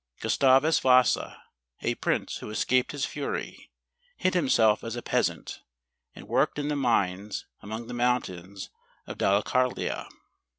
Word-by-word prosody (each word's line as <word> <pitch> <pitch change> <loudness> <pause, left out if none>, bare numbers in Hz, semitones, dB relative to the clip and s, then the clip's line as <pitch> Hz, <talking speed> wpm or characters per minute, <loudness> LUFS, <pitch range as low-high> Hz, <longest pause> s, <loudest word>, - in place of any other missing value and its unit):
Gustavus 135 +4 +3
Vasa, 130 -1 +3 0.4
a - - +1
prince - - -2
who - - -9
es¬ 110 - -2
caped 130 0 +2
his 145 -1 -2
fury, 145 -1 -5 0.5
hid 185 - +1
himself 115 -10 +3
as 115 0 -5
a 120 - -6
peasant, - - -1 0.5
and - - -12
worked 130 +7 +1
in 145 0 -2
the 150 - 0
mines 105 -6 0 0.2
among 110 +3 -6
the 125 - -8
mountains 100 -6 -2 0.3
of - - -8
Da 100 - +3
lecarlia. 125 +4 -1
125 Hz, 140 wpm, -27 LUFS, 105-135 Hz, 0.5 s, Gustavus